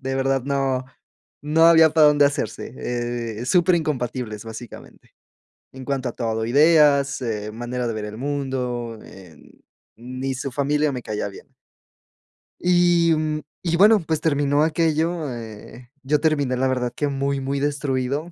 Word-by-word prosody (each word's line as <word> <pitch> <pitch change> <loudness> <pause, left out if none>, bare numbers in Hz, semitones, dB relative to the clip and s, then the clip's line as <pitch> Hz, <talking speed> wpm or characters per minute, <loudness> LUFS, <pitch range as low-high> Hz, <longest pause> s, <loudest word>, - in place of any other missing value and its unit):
de 135 0 -3
verdad, 135 -1 0
no 135 -2 -1 0.6
no 155 +2 +3
había 160 -1 +7
para 155 0 +5
dónde 145 -1 +4
hacerse, 140 - -4
eh, 120 -1 -4
superincompatibles, 130 - 0
básicamente, 115 +1 -11 0.6
en 130 0 -10
cuanto 135 -1 -2
a - - -11
todo, 110 -2 -2
ideas, 145 0 +4
eh, 105 -3 -3
manera 120 +2 -4
de 115 - -2
ver 110 -1 -4
el 105 0 -8
mundo, 125 -4 -3
eh, 90 -4 -14 0.6
ni 130 +3 -5
su 135 +1 -4
familia 145 +2 0
me 125 - -5
caía 105 -2 -3
bien. 100 - -13 1.1
Y, 175 -2 +3
mm, 155 0 -2 0.2
y 170 -2 0
bueno, 210 +4 +6
pues 160 -3 -2
terminó 145 -1 +2
aquello, 160 0 0
eh, 115 +1 -10
yo 145 +2 +1
terminé 145 -5 +1
la 130 +1 +1
verdad 125 -2 -1
que 145 - -1
muy, 140 0 -1
muy 135 +1 -2
destruido, 140 +1 -2
135 Hz, 145 wpm, -22 LUFS, 120-155 Hz, 1.1 s, había